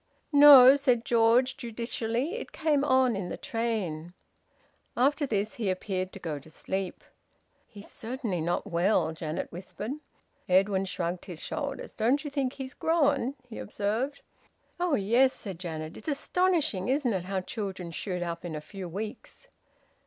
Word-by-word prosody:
"No," 280 -2 +10
said 250 -5 +1
George 240 +3 +3
judicially. 235 - -2
"It 485 - -6
came 300 -4 +1
on 260 -4 +3
in 190 -2 -4
the - - -5
train." 185 -8 -3 0.8
After 285 +4 +2
this, 210 -2 -1
he 220 -5 -2
appeared 185 0 -2
to - - -8
go 155 -5 -4
to 140 - -16
sleep. 190 +3 -4 0.6
"He's 205 -1 -12
certainly 225 - -4
not 175 +2 -1
well," 180 -1 +2
Janet 160 0 -4
whispered. 190 +5 -6 0.6
Edwin 190 +1 +3
shrugged 175 -1 -3
his 175 -5 -7
shoulders. 285 -2 -4
"Don't 250 +7 +1
you 290 - -5
think 275 -2 -1
he's 265 0 -7
grown?" 285 -6 +1
he 230 - -8
observed. 220 +8 -2 0.6
"Oh 350 -4 +2
yes!" 240 +6 +3
said 190 -6 -8
Janet. 160 -3 -5
"It's - - -11
astonishing, 310 - +1
isn't 265 -3 +1
it, 180 -2 -2
how 190 0 -2
children 190 -3 -5
shoot 180 +1 -3
up 170 -1 -5
in 170 -3 -5
a - - -3
few 185 +3 -8
weeks!" 215 - -7
220 Hz, 155 wpm, -28 LUFS, 185-265 Hz, 0.8 s, No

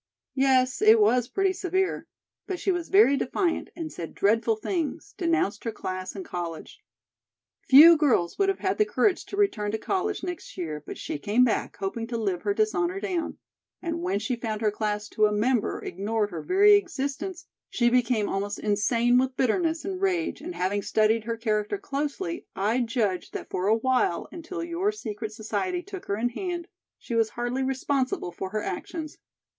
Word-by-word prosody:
"Yes; 260 0 +2
it 435 +1 +7
was 250 - +3
pretty 390 +3 +1
severe. 375 0 -1 0.4
But 375 -2 -3
she 390 - +1
was 350 -2 -3
very 385 -8 +6
defiant, 330 +6 -1
and 325 -2 -6
said 165 - -7
dreadful 225 +2 +2
things, 330 - -3
denounced 330 - 0
her 230 - -2
class 185 -3 -5
and 190 - -6
college. 170 -2 -6 0.9
Few 310 +5 +10
girls 270 - +1
would 395 -1 +3
have 390 - 0
had 380 +2 0
the - - +7
courage 420 -3 +1
to 400 - -7
return 225 - +1
to - - +1
college 395 - -2
next 355 -2 -6
year, 155 -4 -4
but - - -8
she - - -5
came 210 +10 +3
back, 240 - 0
hoping 225 +4 -3
to 235 -1 -3
live 195 -5 -1
her 405 - 0
dishonor 390 -4 0
down, 355 -4 -3 0.4
and 335 -1 -3
when 345 - 0
she 215 +4 -2
found 225 -2 -4
her 215 -1 +2
class 210 0 -2
to 215 0 +3
a - - -2
member 225 +3 0
ignored 205 +3 -2
her 165 -3 -5
very 400 - +5
existence, 345 -1 -1 0.2
she 240 - +1
became 240 -4 +2
almost 200 +1 -2
insane 230 +4 +2
with 260 0 -1
bitterness 320 +7 +1
and 385 -1 -4
rage, 360 -4 0
and 350 +3 -6
having 195 +3 0
studied 215 +2 +2
her 230 0 -2
character 215 - -1
closely, 335 0 -4
I 215 +6 +1
judge 225 -6 -1
that - - -6
for 185 +2 -1
a 220 +2 +4
while, 255 -6 +1
until 345 +1 -6
your 340 +5 0
secret 220 - -6
society 350 - -3
took 390 -1 -8
her 200 - -1
in 240 +3 0
hand, 345 +5 -4 0.3
she - - -7
was 225 -1 +2
hardly 240 +3 -2
responsible 265 -6 -1
for 190 - -5
her 215 +2 -3
actions. 310 - -5
255 Hz, 185 wpm, -26 LUFS, 215-355 Hz, 0.9 s, Few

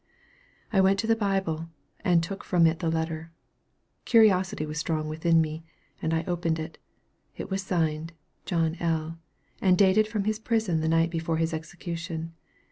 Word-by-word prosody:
I 195 - +5
went 190 +1 +4
to - - -4
the 225 0 +3
Bible, 190 -6 -1 0.3
and 170 -2 +3
took 195 +4 -5
from 175 -3 +3
it 160 0 +2
that 170 -3 0
letter. 160 0 -3 0.7
Curiosity 190 -8 +4
was 150 0 -4
strong 155 0 -1
within 165 +2 +2
me, 160 0 -1 0.4
and 160 - -1
I 165 0 +1
opened 170 -2 -1
it. 160 +1 -7 0.6
It - - -6
was 195 +1 0
signed 165 -3 -1 0.3
"John 165 -3 0
L.," 165 -1 -1 0.4
and 185 -2 +4
dated 200 +2 +4
from 215 -2 -2
his 215 +1 -1
prison 220 -7 0
the 160 0 0
night 165 +1 +3
before 165 -1 -1
his 165 0 0
execution. 165 0 -5
165 Hz, 165 wpm, -27 LUFS, 160-190 Hz, 0.7 s, I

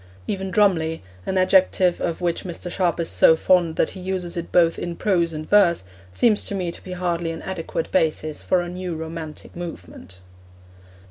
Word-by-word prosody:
Even 190 - -3
'drumly,' 175 - +2 0.2
an 190 - 0
adjective 185 -1 +3
of 170 0 -2
which 170 -1 -1
Mr. 175 -1 -6
Sharp 175 -3 0
is 165 - 0
so 160 - +5
fond 170 -1 +2
that - - +1
he 190 - -9
uses 180 -1 -3
it 170 -1 -5
both 170 -2 +3
in 175 -1 -4
prose 170 -3 +1
and 155 0 -6
verse, 190 - +4 0.3
seems 210 - +2
to 200 - -3
me 180 -3 -2
to - - -8
be 185 - -7
hardly 175 -2 -1
an 165 0 -6
adequate 165 -3 -4
basis 155 -1 0
for 185 - +1
a 175 - -5
new 180 -1 -5
romantic 160 -1 -7
movement. 170 - -9
175 Hz, 185 wpm, -23 LUFS, 165-185 Hz, 0.3 s, so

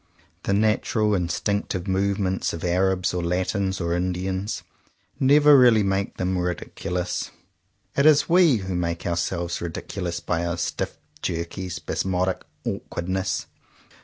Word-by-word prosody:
The 100 - 0
natural, 105 +1 +2
instinctive 95 +1 -1
movements 95 0 0
of 85 - -6
Arabs 90 +1 +1
or 90 - -1
Latins 95 +2 -1
or 85 -1 -1
Indians 95 +3 -2 0.6
never 145 +2 +6
really 120 -5 +6
make 95 0 -1
them 90 0 0
ridiculous. 90 0 -3 0.7
It 140 +2 +4
is 150 -2 +5
we 170 -5 +5
who 95 -3 -3
make 85 -1 -2
ourselves 85 0 -1
ridiculous 85 +1 -4
by 85 0 -1
our 85 0 -2
stiff, - - -3 0.2
jerky, 85 +2 -3
spasmodic 90 +2 -1 0.2
awkwardness. 95 +3 -2
95 Hz, 120 wpm, -24 LUFS, 85-100 Hz, 0.7 s, never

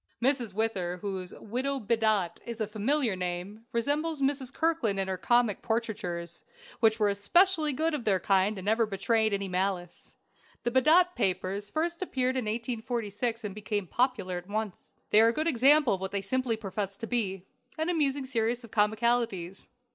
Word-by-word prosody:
Mrs. 245 -3 +2
Whither, 195 -5 -1
whose 190 -1 -5
"Widow 260 +5 -2
Bedott" 215 -5 +1
is 235 0 -7
a 215 - 0
familiar 220 +2 0
name, 185 +5 -5
resembles 290 +6 0
Mrs. 270 -2 0
Kirkland 315 -13 0
in 190 - 0
her 190 - -1
comic 235 +2 +2
portraitures, 205 -7 -3 0.4
which 225 -1 +3
were 210 - +3
especially 310 - +3
good 315 +4 0
of 290 -5 -2
their 195 -4 +2
kind, 195 +2 +2
and 190 - -7
never 220 +2 +2
betrayed 220 +2 +1
any 200 -1 -1
malice. 180 -1 -3 0.5
The 240 - 0
"Bedott 325 +8 +5
Papers" 195 -1 -1
first 335 - -2
appeared 260 -7 0
in 255 -3 -1
1846, 230 0 -3
and 205 -2 -4
became 205 -1 -3
popular 200 -4 0
at 180 +2 -16
once. 215 -2 -5 0.2
They 215 - +7
are 225 +1 +6
good 310 +7 -1
examples 275 -4 +5
of - - -16
what 190 0 -3
they 200 - 0
simply 240 +3 -1
profess 200 -1 -4
to 225 - -5
be: 200 -6 -2 0.3
an 315 +1 -1
amusing 285 -5 +1
series 240 -1 -1
of 230 - -12
comicalities. 215 -4 0
225 Hz, 170 wpm, -29 LUFS, 195-255 Hz, 0.5 s, They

